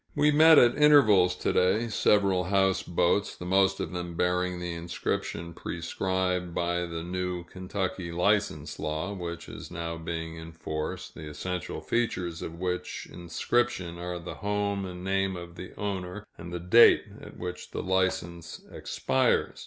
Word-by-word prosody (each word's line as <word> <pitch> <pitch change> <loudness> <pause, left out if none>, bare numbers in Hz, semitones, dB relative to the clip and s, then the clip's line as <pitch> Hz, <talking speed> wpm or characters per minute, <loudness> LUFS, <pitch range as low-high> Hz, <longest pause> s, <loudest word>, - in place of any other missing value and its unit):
We 150 0 +4
met 160 +1 +8
at 120 0 +6
intervals 110 -12 +6
to - - -1
day, 95 +6 +3
several 100 -4 +3
houseboats, 95 0 +1
the 90 - -8
most 95 +1 +3
of - - -3
them 85 -1 -5
bearing 90 +1 0
the 90 -1 -4
inscription 85 0 -3
prescribed 90 +1 -2
by 85 0 0
the 85 -1 -5
new 90 0 -3
Kentucky 95 0 -4
license 100 +5 0
law, 80 +5 -2
which 85 -3 -6
is - - -9
now 85 -1 -4
being 80 0 -5
enforced, 80 -1 -5
the 80 -1 -8
essential 90 +3 -4
features 90 -8 -1
of 85 +1 -6
which 90 0 -3
inscription 90 0 -1
are 90 0 -4
the 85 +1 -7
home 100 -1 -1
and 90 0 -8
name 95 0 0
of 85 0 -9
the 90 +1 -9
owner, 100 0 -4
and 85 +1 -9
the 90 - -3
date 90 +7 +7 0.2
at - - -11
which 90 0 -6
the - - -4
license 95 -3 -1
expires. - - 0
90 Hz, 150 wpm, -28 LUFS, 85-95 Hz, 0.2 s, met